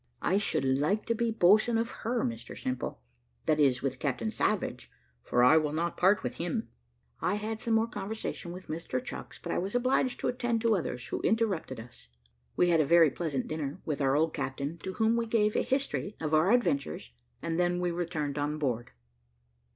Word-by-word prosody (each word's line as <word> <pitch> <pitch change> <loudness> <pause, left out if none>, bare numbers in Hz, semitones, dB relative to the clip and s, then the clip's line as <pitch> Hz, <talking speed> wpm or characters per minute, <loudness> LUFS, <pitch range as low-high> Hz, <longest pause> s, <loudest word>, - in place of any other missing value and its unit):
"I 190 +3 +3
should 160 -8 0
like 145 +11 +1
to 230 - +1
be 235 0 0
boatswain 220 +3 +4
of 230 +1 -1
her, 235 +1 0
Mr 115 0 -4
Simple: 130 - -3 0.4
that 155 -1 +2
is, 135 -4 +3
with 130 -2 -2
Captain 145 - -1
Savage, 215 -2 -1 0.3
for 120 - +2
I 140 +6 +7
will 150 -2 +1
not 170 +2 -1
part 190 +1 +3
with - - -4
him." 175 +7 -2 0.5
I - - +1
had 215 +1 -3
some 230 -1 +1
more 225 0 +3
conversation 205 -4 -5
with 185 +1 -9
Mr 155 -5 -3
Chucks, 120 -1 -7
but - - -6
I - - +1
was 195 +5 -3
obliged 255 +1 +1
to - - 0
attend 240 -2 0
to 230 -2 +3
others, 125 -9 -3
who - - -2
interrupted 200 - 0
us. 115 - -12 0.5
We 175 - +3
had 165 -2 +4
a - - +4
very 165 0 +6
pleasant 150 -5 -2
dinner 150 -3 -4
with 150 -2 -2
our 135 0 +3
old 160 +1 +2
captain, 140 +4 -3
to 190 - -5
whom 225 +3 +2
we 230 0 -1
gave 215 -2 +2
a - - +3
history 265 -6 -1
of 155 -1 -2
our 155 +6 +4
adventures, 140 - 0 0.3
and 165 +1 -2
then 175 0 +2
we 180 -1 0
returned 160 -4 -2
on 145 +1 -1
board. 120 - -2
170 Hz, 200 wpm, -30 LUFS, 145-220 Hz, 0.5 s, I